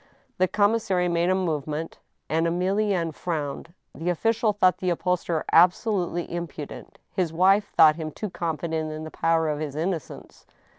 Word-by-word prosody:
The 185 - +4
commissary 205 -3 +1
made 170 0 +1
a 185 - +3
movement, 155 -3 -3 0.3
and 165 +1 +1
Emilienne 185 0 0
frowned. 160 +1 -4 0.2
The 165 +5 -3
official 225 +5 +1
thought 190 -3 +2
the 185 - -1
upholsterer 175 -2 -1
absolutely 175 0 +3
impudent; 170 -4 -7 0.2
his 180 -4 0
wife 195 +5 +3
thought 155 -1 +7
him 160 -2 -4
too 205 +6 -6
confident 160 -2 -3
in 155 0 -6
the 155 - -7
power 165 -1 +1
of 150 -1 -1
his 150 -2 -4
innocence. 165 0 -5
170 Hz, 150 wpm, -25 LUFS, 160-185 Hz, 0.3 s, thought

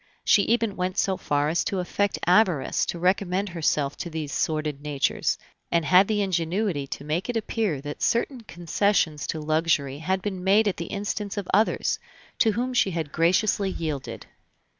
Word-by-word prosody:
She 205 - +5
even 225 0 +1
went 180 0 -2
so 190 - +2
far 145 -4 0
as 165 - +1
to 200 -4 -1
affect 195 +2 -1
avarice 180 -5 +3
to - - -3
recommend 185 +2 +1
herself 150 -4 0
to 175 - -5
these 155 -3 -5
sordid 155 -2 -1
natures; 145 -2 0 0.3
and 170 -1 +2
had 185 +4 +6
the 210 -2 +1
ingenuity 175 -3 -1
to 140 - -6
make 160 +7 -2
it 240 - 0
appear 210 - -1
that 145 +1 -7
certain 240 +2 0
concessions 175 -5 0
to 160 - -3
luxury 155 -3 0
had 185 +4 -1
been 190 -3 -4
made 205 +3 +4
at 200 - 0
the 170 - -4
instance 205 0 -4
of 200 -3 -3
others, 215 +3 +2 0.4
to 220 -3 +4
whom 250 +4 -2
she 240 - +3
had 165 -5 -3
graciously 190 +5 +2
yielded. 155 -6 -4
180 Hz, 175 wpm, -25 LUFS, 155-205 Hz, 0.4 s, had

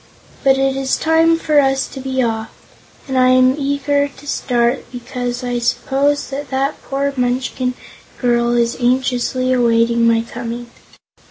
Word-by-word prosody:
But 270 -1 +4
it 270 0 +1
is 270 -1 0
time 325 +1 +3
for 305 -2 +2
us 270 -1 +2
to - - -9
be 260 -1 -1
off, 220 -1 -2 0.6
and 265 - -3
I 255 - +5
am 255 0 +5
eager 285 0 0
to 285 0 -16
start 245 -3 0
because 245 0 -5
I 245 -1 -1
suppose 270 +4 0
that 280 0 -5
that 275 +2 -1
poor 275 +1 -2
Munchkin 250 0 -1 0.4
girl 240 -1 +1
is 235 0 +1
anxiously 255 +1 +1
awaiting 235 -1 +3
my 230 -1 +3
coming." 235 0 -7
255 Hz, 150 wpm, -18 LUFS, 240-275 Hz, 0.6 s, I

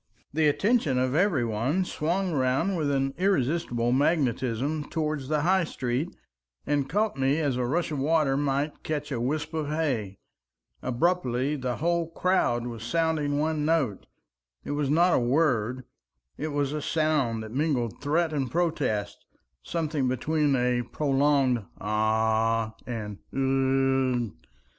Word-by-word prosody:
The 155 0 +3
attention 175 - +2
of 130 0 +1
every 160 -6 +2
one 125 - 0
swung 180 +4 -1
round 135 +8 +1
with 155 -4 0
an 135 -1 0
irresistible 140 -9 +1
magnetism 135 0 +1
towards 155 -4 -2
the 150 0 +1
High 185 +3 +3
Street, 130 +3 -2 0.6
and 145 -2 0
caught 210 -4 0
me 135 +2 +2
as 145 -5 0
a 125 -1 -1
rush 165 +5 0
of 145 - -2
waters 145 -1 +2
might 145 +1 -1
catch 150 -2 -3
a 120 -3 -2
wisp 150 +5 -2
of 155 -2 -2
hay. 130 -11 -1 0.6
Abruptly 130 -1 0
the 130 -3 -2
whole 170 +3 0
crowd 165 -9 +1
was 115 -3 -6
sounding 150 +1 0
one 155 0 0
note. 150 - 0 0.6
It - - -4
was 145 -1 -1
not 175 +4 +4
a - - +4
word, 125 -2 +1 0.5
it 155 - -4
was 145 -1 -1
a 150 - -2
sound 145 -9 0
that 110 - -8
mingled 130 -6 -1
threat 155 +3 +1
and 135 -4 -1
protest, 135 -10 -1 0.4
something 155 - -1
between 145 +3 +1
a 125 -1 +1
prolonged 135 -2 +1 0.2
"Ah!" 110 +1 +1
and 105 -4 -5 0.2
"Ugh!" 135 -3 +1
140 Hz, 140 wpm, -27 LUFS, 125-155 Hz, 0.6 s, not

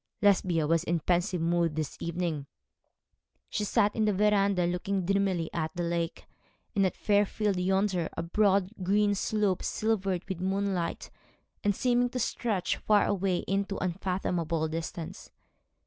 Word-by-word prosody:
Lesbia 180 -5 +3
was 165 +2 +2
in 175 - 0
a - - 0
pensive 175 +1 +1
mood 170 -1 +1
this 155 -2 -3
evening. 170 -4 -3 1.0
She 210 - -1
sat 210 0 +2
in 220 - +2
the 210 - +2
verandah, 200 -2 +3
looking 180 +2 -1
dreamily 195 -3 +1
at 160 -2 -1
the 175 - -2
lake, 170 0 -2 0.5
and 195 -2 +4
at - - -5
Fairfield 205 -1 +1
yonder, 190 -2 +1
a - - -1
broad 195 +1 +2
green 205 +2 +2
slope, 205 -2 0
silvered 195 -5 -1
with 190 -3 -4
moonlight, 190 -2 -1 0.5
and 205 -1 +2
seeming 245 +1 +2
to 250 - -5
stretch 215 -5 -1
far 210 -1 +3
away 190 -2 0
into 195 0 -1
unfathomable 175 -3 -1
distance. 160 +1 -6
190 Hz, 145 wpm, -29 LUFS, 170-205 Hz, 1.0 s, and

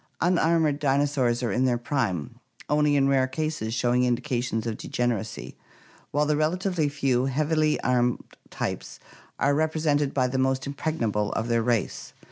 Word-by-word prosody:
Unarmored 165 -4 +2
dinosaurs 135 -4 +1
are 115 - 0
in 125 +6 +1
their 125 -2 +2
prime, 115 - -2 0.3
only 150 0 +2
in 135 -1 +3
rare 135 -1 +3
cases 155 -4 -3
showing 120 +1 +1
indications 120 -2 -1
of 115 -2 -2
degeneracy, 110 - -3 0.5
while 145 +1 +1
the 150 0 +1
relatively 165 +1 0
few 135 -3 +1
heavily 155 +3 +1
armored 125 -1 +2 0.3
types - - -4 0.4
are 140 +1 +2
represented 155 -2 +1
by 130 -2 +1
the 130 +1 -1
most 130 0 +1
impregnable 120 -8 -1
of 110 +2 -2
their 115 -1 +2
race. 115 -3 -1
135 Hz, 145 wpm, -26 LUFS, 120-150 Hz, 0.5 s, in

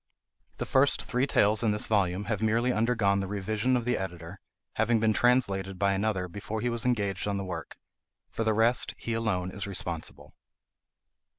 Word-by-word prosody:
The - - -3
first 135 +1 +3
three 125 +3 0
tales 105 -4 +3
in 110 -3 +2
this 105 - 0
volume 100 -2 +1
have 105 -2 -2
merely 115 +3 +2
undergone 110 -3 +2
the 95 - -2
revision 110 +5 0
of 120 - -3
the 125 0 0
editor, 90 0 -7 0.3
having 110 +1 +2
been 110 0 +2
translated 100 -6 +1
by 100 +1 +2
another 95 -2 -1
before 105 +4 -5
he 120 - -1
was 120 +1 -1
engaged 100 -6 0
on 100 -1 -1
the 100 - -3
work. 85 -5 -6 0.5
For 115 - -2
the 110 -1 +1
rest 115 +3 +2
he 115 - -4
alone 105 -5 -1
is 100 +2 -4
responsible. 85 -4 -5
105 Hz, 180 wpm, -28 LUFS, 95-115 Hz, 0.5 s, first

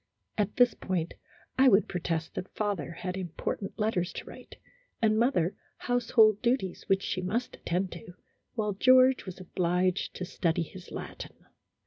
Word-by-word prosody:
At 210 -1 -1
this 245 -2 +5
point, 175 -3 -2 0.5
I 265 - +7
would 205 -4 +5
protest 165 -2 -2
that 185 - -6
father 200 -7 -2
had 180 +2 -5
important 190 +2 -4
letters 210 -5 0
to - - -6
write, - - -12 0.4
and 220 -2 +3
mother 230 -8 +2 0.2
household 225 -3 +3
duties 235 -7 0
which 195 0 +2
she 185 - -2
must 220 +7 -2
attend 180 +2 -1
to, 175 +1 -10 0.4
while 210 -3 0
George 255 +3 +5
was 185 0 -7
obliged 180 +1 0
to 180 - -4
study 170 -2 0
his 180 +2 -11
Latin. - - -8
190 Hz, 150 wpm, -29 LUFS, 180-220 Hz, 0.5 s, I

